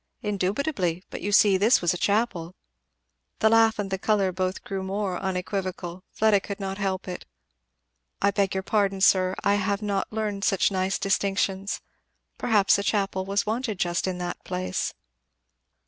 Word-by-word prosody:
"Indubitably. 195 Hz, -, -1 dB
But -, -, -6 dB
you 205 Hz, -, -2 dB
see, 200 Hz, -1 st, +5 dB
this 215 Hz, +6 st, +4 dB
was 175 Hz, 0 st, +1 dB
a -, -, -4 dB
chapel." 195 Hz, -3 st, 0 dB, 0.8 s
The 220 Hz, -, +4 dB
laugh 225 Hz, -1 st, +5 dB
and 200 Hz, -2 st, -3 dB
the 190 Hz, -, -1 dB
colour 200 Hz, -2 st, +2 dB
both 185 Hz, +1 st, -2 dB
grew 195 Hz, -1 st, -4 dB
more 190 Hz, -1 st, -2 dB
unequivocal 185 Hz, -1 st, -3 dB
Fleda 215 Hz, -2 st, +3 dB
could 200 Hz, +1 st, -7 dB
not 195 Hz, 0 st, -4 dB
help 195 Hz, -2 st, -2 dB
it. 180 Hz, -1 st, -6 dB, 0.9 s
"I 200 Hz, -, +3 dB
beg 200 Hz, -1 st, 0 dB
your 190 Hz, -, -1 dB
pardon, 195 Hz, -2 st, 0 dB
sir 185 Hz, -1 st, +4 dB
I 200 Hz, -, +3 dB
have 200 Hz, +2 st, -1 dB
not 200 Hz, -2 st, -1 dB
learned 210 Hz, -2 st, -3 dB
such 195 Hz, 0 st, +2 dB
nice 190 Hz, 0 st, 0 dB
distinctions 195 Hz, 0 st, 0 dB, 0.6 s
Perhaps 205 Hz, -3 st, +3 dB
a -, -, -2 dB
chapel 195 Hz, -1 st, 0 dB
was 200 Hz, +1 st, 0 dB
wanted 220 Hz, -1 st, -2 dB
just 175 Hz, +1 st, 0 dB
in 185 Hz, -1 st, -2 dB
that 175 Hz, 0 st, -5 dB
place." 185 Hz, 0 st, -2 dB
195 Hz, 165 wpm, -26 LUFS, 185-205 Hz, 0.9 s, see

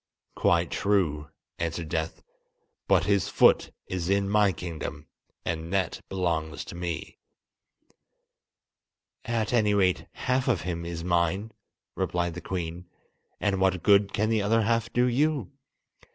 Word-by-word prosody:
"Quite 85 Hz, -1 st, +2 dB
true," 85 Hz, -8 st, +1 dB, 0.3 s
answered 85 Hz, -1 st, -3 dB
Death; 80 Hz, -1 st, -3 dB, 0.6 s
"but -, -, +4 dB
his 100 Hz, -3 st, +1 dB
foot -, -, +4 dB, 0.2 s
is 90 Hz, -1 st, -3 dB
in 100 Hz, 0 st, +2 dB
my 105 Hz, -1 st, +4 dB
kingdom, 85 Hz, -2 st, -6 dB, 0.4 s
and 80 Hz, +1 st, -3 dB
that 95 Hz, -1 st, 0 dB
belongs 80 Hz, -5 st, -2 dB
to -, -, -9 dB
me!" 85 Hz, -2 st, -5 dB, 2.1 s
"At 115 Hz, -1 st, -1 dB
any 105 Hz, -3 st, +3 dB
rate 95 Hz, -3 st, +2 dB
half 130 Hz, 0 st, 0 dB
of 120 Hz, -8 st, +2 dB
him 85 Hz, -1 st, -4 dB
is 85 Hz, -1 st, -5 dB
mine," 90 Hz, +5 st, 0 dB, 0.4 s
replied 85 Hz, -1 st, -1 dB
the 90 Hz, -, -7 dB
Queen, 90 Hz, -1 st, -4 dB, 0.5 s
"and 100 Hz, -2 st, 0 dB
what 95 Hz, -3 st, +2 dB
good 100 Hz, 0 st, +5 dB
can 110 Hz, +2 st, 0 dB
the 110 Hz, -2 st, +2 dB
other 110 Hz, +2 st, +2 dB
half 115 Hz, +1 st, 0 dB
do 125 Hz, +1 st, +3 dB
you? 135 Hz, -, +1 dB
95 Hz, 135 wpm, -27 LUFS, 85-105 Hz, 2.1 s, good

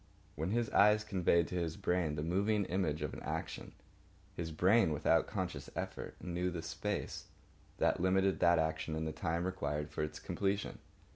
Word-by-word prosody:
When 80 Hz, +4 st, -2 dB
his 115 Hz, +2 st, +1 dB
eyes 105 Hz, +1 st, +5 dB
conveyed 90 Hz, -4 st, +2 dB
to 90 Hz, -, -1 dB
his 80 Hz, -2 st, -2 dB
brain 85 Hz, -4 st, 0 dB
the 75 Hz, -, -2 dB
moving 100 Hz, +5 st, +1 dB
image 80 Hz, -5 st, -1 dB
of 75 Hz, -, -3 dB
an -, -, -6 dB
action, -, -, -5 dB, 0.6 s
his 85 Hz, -1 st, -3 dB
brain 95 Hz, +2 st, +4 dB
without 75 Hz, +2 st, +3 dB
conscious 90 Hz, -8 st, -4 dB
effort, -, -, -5 dB
knew 90 Hz, 0 st, -2 dB
the 85 Hz, -2 st, -5 dB
space 85 Hz, +6 st, -3 dB, 0.5 s
that -, -, +2 dB
limited 95 Hz, +1 st, +2 dB
that 85 Hz, -1 st, +5 dB
action 80 Hz, 0 st, -1 dB
and 80 Hz, 0 st, -2 dB
the -, -, -2 dB
time 85 Hz, +3 st, -1 dB
required 75 Hz, -5 st, -2 dB
for -, -, -3 dB
its 75 Hz, 0 st, -3 dB
completion. 100 Hz, 0 st, -2 dB
85 Hz, 170 wpm, -34 LUFS, 80-95 Hz, 0.6 s, eyes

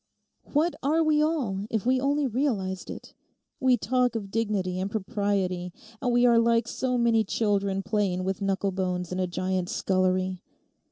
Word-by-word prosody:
What 315 Hz, +4 st, +2 dB
are 315 Hz, +4 st, +2 dB
we 305 Hz, -1 st, +3 dB
all 245 Hz, -11 st, -1 dB
if 220 Hz, -1 st, -2 dB
we 255 Hz, +1 st, +2 dB
only 285 Hz, +1 st, +1 dB
realized 215 Hz, -8 st, -1 dB
it? -, -, -9 dB, 0.5 s
We 260 Hz, -2 st, +4 dB
talk 250 Hz, 0 st, +1 dB
of 200 Hz, -3 st, -4 dB
dignity 200 Hz, -5 st, -1 dB
and 190 Hz, +1 st, -2 dB
propriety, 190 Hz, -3 st, -1 dB, 0.3 s
and 245 Hz, -, +1 dB
we 240 Hz, 0 st, +4 dB
are 235 Hz, -1 st, +5 dB
like 230 Hz, 0 st, +2 dB
so 250 Hz, -1 st, -1 dB
many 230 Hz, -2 st, +3 dB
children 200 Hz, -2 st, 0 dB
playing 195 Hz, -4 st, 0 dB
with 190 Hz, 0 st, -2 dB
knucklebones 190 Hz, -2 st, -1 dB
in 185 Hz, -, -2 dB
a 185 Hz, -, 0 dB
giant's 185 Hz, 0 st, -2 dB
scullery. 185 Hz, -1 st, 0 dB
205 Hz, 160 wpm, -27 LUFS, 185-245 Hz, 0.5 s, are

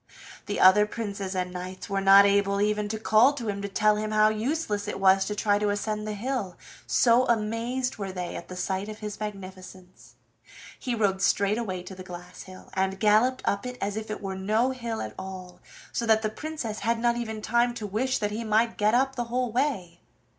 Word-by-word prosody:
The 205 Hz, -, -2 dB
other 210 Hz, +3 st, +6 dB
princes 200 Hz, -4 st, -5 dB
and 180 Hz, -1 st, -2 dB
knights 185 Hz, +1 st, -7 dB
were 195 Hz, -1 st, -1 dB
not 195 Hz, +1 st, +8 dB
able 200 Hz, 0 st, +2 dB
even 210 Hz, 0 st, 0 dB
to 220 Hz, -, -2 dB
call 220 Hz, +5 st, +4 dB
to 205 Hz, -7 st, -4 dB
tell 210 Hz, +1 st, +2 dB
him 215 Hz, 0 st, -2 dB
how 215 Hz, 0 st, +4 dB
useless 215 Hz, -1 st, -2 dB
it -, -, -4 dB
was 190 Hz, 0 st, +4 dB
to 210 Hz, -, -3 dB
try 205 Hz, -1 st, +2 dB
to 210 Hz, 0 st, +1 dB
ascend 210 Hz, +1 st, -2 dB
the 210 Hz, -, -3 dB
hill, 210 Hz, -5 st, -3 dB, 0.3 s
so 245 Hz, +1 st, +4 dB
amazed 235 Hz, +3 st, -1 dB
were 195 Hz, -2 st, -4 dB
they 180 Hz, -1 st, -5 dB
at 170 Hz, -, -8 dB
sight 190 Hz, +3 st, -2 dB
of 215 Hz, -, -7 dB
his 210 Hz, -1 st, -7 dB
magnificence. 185 Hz, -3 st, -9 dB, 0.6 s
He 245 Hz, -2 st, -2 dB
rode 195 Hz, -4 st, +1 dB
straight 200 Hz, +2 st, +2 dB
away 185 Hz, -6 st, -4 dB
to 185 Hz, -, -9 dB
the 185 Hz, -, -10 dB
glass 180 Hz, 0 st, -10 dB
hill, 185 Hz, 0 st, -13 dB
and 190 Hz, 0 st, -1 dB
galloped 220 Hz, +5 st, +3 dB
up 200 Hz, -, 0 dB
it 250 Hz, 0 st, -7 dB
as 200 Hz, 0 st, -2 dB
if 220 Hz, 0 st, -5 dB
it 215 Hz, -, -5 dB
were 195 Hz, -1 st, -3 dB
no 215 Hz, +7 st, +1 dB
hill 235 Hz, -3 st, -4 dB
at 110 Hz, -, -7 dB
all, 185 Hz, -1 st, -8 dB, 0.3 s
so 235 Hz, -, -2 dB
that 220 Hz, 0 st, +4 dB
the 215 Hz, -, +1 dB
Princess 255 Hz, -5 st, -5 dB
had 230 Hz, +3 st, 0 dB
not 235 Hz, +1 st, +1 dB
even 220 Hz, -2 st, -4 dB
time 240 Hz, +2 st, +1 dB
to 220 Hz, -, -5 dB
wish 240 Hz, +6 st, 0 dB
that 210 Hz, -1 st, -2 dB
he 220 Hz, +3 st, -3 dB
might 225 Hz, +1 st, +1 dB
get 210 Hz, +2 st, +3 dB
up 270 Hz, +2 st, +2 dB
the 240 Hz, -1 st, -2 dB
whole 245 Hz, 0 st, -1 dB
way. 215 Hz, -, -1 dB
210 Hz, 210 wpm, -27 LUFS, 195-230 Hz, 0.6 s, not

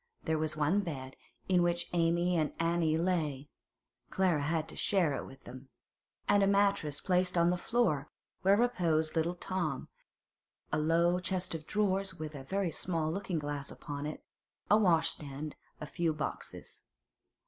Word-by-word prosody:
There 160 Hz, -1 st, 0 dB
was 155 Hz, -1 st, -1 dB
one 155 Hz, +7 st, +3 dB
bed, 135 Hz, -9 st, -5 dB, 0.3 s
in 180 Hz, -2 st, +4 dB
which 175 Hz, 0 st, +1 dB
Amy 170 Hz, +1 st, +2 dB
and 155 Hz, -3 st, +1 dB
Annie 165 Hz, -1 st, +2 dB
lay 155 Hz, -5 st, -1 dB, 0.6 s
(Clara 180 Hz, -6 st, +2 dB
had 160 Hz, +2 st, 0 dB
to -, -, -6 dB
share 180 Hz, -7 st, +2 dB
it -, -, -4 dB
with 135 Hz, -, -14 dB
them), 130 Hz, +2 st, -11 dB, 0.6 s
and 205 Hz, 0 st, +5 dB
a 195 Hz, -, +4 dB
mattress 200 Hz, -7 st, +2 dB
placed 180 Hz, -1 st, +1 dB
on 170 Hz, +1 st, +4 dB
the -, -, +1 dB
floor, 175 Hz, -, 0 dB, 0.3 s
where 195 Hz, +2 st, +5 dB
reposed 170 Hz, -10 st, +1 dB
little 165 Hz, +2 st, +1 dB
Tom; 175 Hz, -7 st, -3 dB, 0.8 s
a -, -, +1 dB
low 170 Hz, +3 st, +3 dB
chest 180 Hz, 0 st, -2 dB
of 155 Hz, -1 st, -6 dB
drawers 195 Hz, -2 st, 0 dB
with 155 Hz, -2 st, -6 dB
a 140 Hz, -2 st, -7 dB
very 190 Hz, +2 st, -1 dB
small 160 Hz, -2 st, -1 dB
looking 190 Hz, -1 st, -2 dB
glass 145 Hz, -2 st, -3 dB
upon 145 Hz, 0 st, -5 dB
it, 150 Hz, -, -7 dB, 0.5 s
a -, -, +9 dB
washstand, 155 Hz, -6 st, +1 dB, 0.2 s
a 150 Hz, -, -5 dB
few 165 Hz, +1 st, -1 dB
boxes. 150 Hz, 0 st, -6 dB
165 Hz, 160 wpm, -32 LUFS, 155-185 Hz, 0.8 s, a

